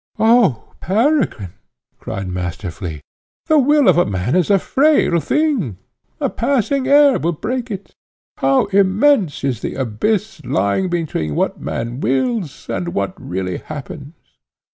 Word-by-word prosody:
"Oh 220 - +3
Peregrine!" 215 - 0 0.5
cried 100 -1 -5
Master 90 +1 -4
Flea, 80 -4 -7 0.4
"the 310 -1 +4
will 290 0 +4
of 175 -1 +4
man 95 - -1
is 180 0 +2
a 200 - +5
frail 270 - +2
thing; 255 - 0 0.4
a - - +1
passing 270 +2 0
air 285 -1 +5
will 170 +2 0
break 245 +9 -4
it. 200 -2 -7 0.4
How 135 0 +2
immense 200 - +3
is 130 -5 -1
the - - -4
abyss 155 - -2
lying 100 - 0
between 155 - -2
what - - -1
man 120 +2 -4
wills 150 - -1
and 175 +1 -3
what 185 - -1
really 90 0 -3
happens! 150 +1 -9
175 Hz, 135 wpm, -18 LUFS, -, 0.5 s, a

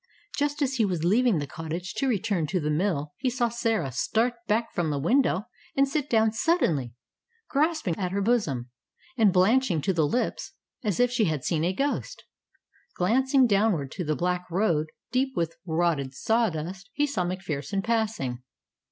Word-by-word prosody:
Just 290 +1 0
as 265 -1 -1
he 230 - +3
was 180 -6 -1
leaving 220 +3 +3
the 145 - -2
cottage 165 +6 -5
to 275 - +1
return 205 -8 0
to 185 +4 0
the 150 -1 -1
mill, 150 -3 -1
he 260 - 0
saw 240 -1 0
Sarah 225 - -1
start 230 - +1
back 225 +2 0
from 170 -3 0
the 145 - -1
window 210 - +2 0.3
and 275 0 +4
sit 290 +1 -2
down 220 -1 +3
suddenly, 170 - +1 0.5
grasping 300 - +1
at 180 -2 -1
her 200 - -1
bosom, 155 - 0 0.4
and 220 -5 +4
blanching 190 0 +3
to 190 - +1
the 160 -4 +2
lips 245 +10 -2 0.3
as 205 -6 -1
if 245 0 +4
she 240 -3 +2
had 155 -6 -1
seen 160 -2 0
a 175 - +2
ghost. 280 +9 -2 0.7
Glancing 260 +8 +3
downward 200 - +2
to 180 - -4
the 155 -1 0
black 180 +1 -1
road, 170 -4 +1 0.2
deep 265 +1 0
with 165 -1 -1
rotted 160 -5 0
sawdust, 190 - -1
he 295 - +2
saw 280 -11 -1
MacPherson 180 -1 -3
passing. 215 - -1
195 Hz, 170 wpm, -26 LUFS, 160-240 Hz, 0.7 s, and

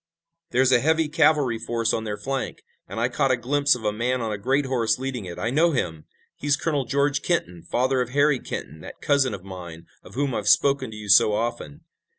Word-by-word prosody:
"There's 130 -4 +3
a 125 - +5
heavy 160 +4 +2
cavalry 150 -6 +2
force 115 -1 -1
on 110 - -2
their 105 -1 -4
flank, 135 +5 -4 0.2
and - - -6
I 120 - +2
caught 135 +2 0
a 130 - +2
glimpse 140 +4 +2
of 120 - -9
a 105 -1 0
man 125 +4 -1
on 115 -2 -3
a 105 - -3
great 135 +6 +1
horse 125 -4 +1
leading 130 -5 -4
it. 85 -1 -8
I 110 - -2
know 160 +4 +3
him. 80 - -3 0.3
He's 145 0 0
Colonel 145 -4 -1
George 140 +2 0
Kenton, 90 - -2
father 130 +9 0
of 125 - -3
Harry 145 0 +2
Kenton, 75 - -7
that - - -11
cousin 140 -6 +1
of 95 - -12
mine, 85 -3 -9 0.2
of - - -15
whom 140 -1 -1
I've 105 -3 -3
spoken 140 -3 +3
to 110 - -9
you 105 -1 -8
so 100 +1 +6
often." 120 +6 -3
125 Hz, 220 wpm, -24 LUFS, 110-140 Hz, 0.3 s, so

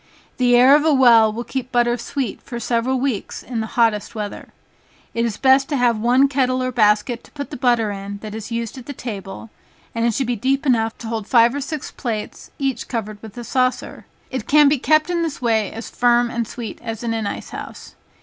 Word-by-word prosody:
The 245 -1 +4
air 260 +3 +7
of 295 - +3
a 320 - +3
well 235 -5 +6
will 230 +3 -5
keep 255 +1 -5
butter 240 -1 +2
sweet 245 0 -4
for 235 - -7
several 240 +3 0
weeks 255 -6 -3
in 245 -3 -4
the 220 - -2
hottest 230 -1 +1
weather. 210 -2 -6 0.6
It 230 0 0
is 225 -3 -3
best 270 0 +4
to 295 - 0
have 240 -3 +2
one 250 +5 +4
kettle 255 -2 0
or 255 - -1
basket 220 +1 +2
to - - -19
put 285 -1 -6
the - - -5
butter 240 -4 +1
in 200 0 -6
that 215 -1 -6
is 220 +1 -7
used 230 +2 -4
at 245 - -13
the 285 - -5
table, 210 -3 -7 0.4
it 230 0 +1
should 270 - 0
be 240 0 -1
deep 270 +6 0
enough 225 -4 +1
to 230 - -8
hold 220 -2 -4
five 235 0 +5
or 285 - -3
six 295 0 -5
plates, 225 -5 -5
each 270 -2 -2
covered 215 -3 -5
with 220 0 -11
a 240 - -5
saucer. 255 +2 -1 0.2
It 260 -4 -4
can 295 0 +6
be 280 -1 +2
kept 310 +5 +2
in 345 -1 0
this 325 -3 -3
way 220 -4 +1
as 225 +1 -8
firm 240 0 +2
and 235 -1 -2
sweet 235 -1 -7
as 225 0 -6
in 230 -1 -1
an 220 -2 -2
ice - - -6
house. - - -9
240 Hz, 225 wpm, -20 LUFS, 225-260 Hz, 0.6 s, air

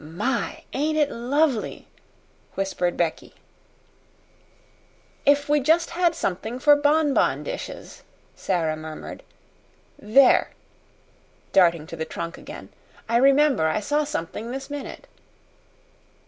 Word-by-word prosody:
"My, 170 - -3
ain't 310 +3 0
it 295 -2 +2
lovely!" 260 +1 -1 0.7
whispered 190 -2 -1
Becky. 165 -2 -2 1.9
"If 285 +1 +4
we 295 0 +3
just 320 +5 +2
had 345 -1 +1
something 220 +6 -3
for 290 +3 +5
bonbon 290 0 +2
dishes," - - -7 0.3
Sara 165 -4 -1
murmured. 155 0 -8 0.8
"There!" 255 +6 +4 1.0
darting 170 -4 +4
to 165 - -8
the 160 - -3
trunk 170 +2 -6
again. - - -10 0.4
"I 230 +1 +2
remember 275 - +4
I 160 - 0
saw 295 +8 0
something 225 - -5
this 270 +3 -6
minute." 290 -1 -7
260 Hz, 105 wpm, -24 LUFS, 175-295 Hz, 1.9 s, for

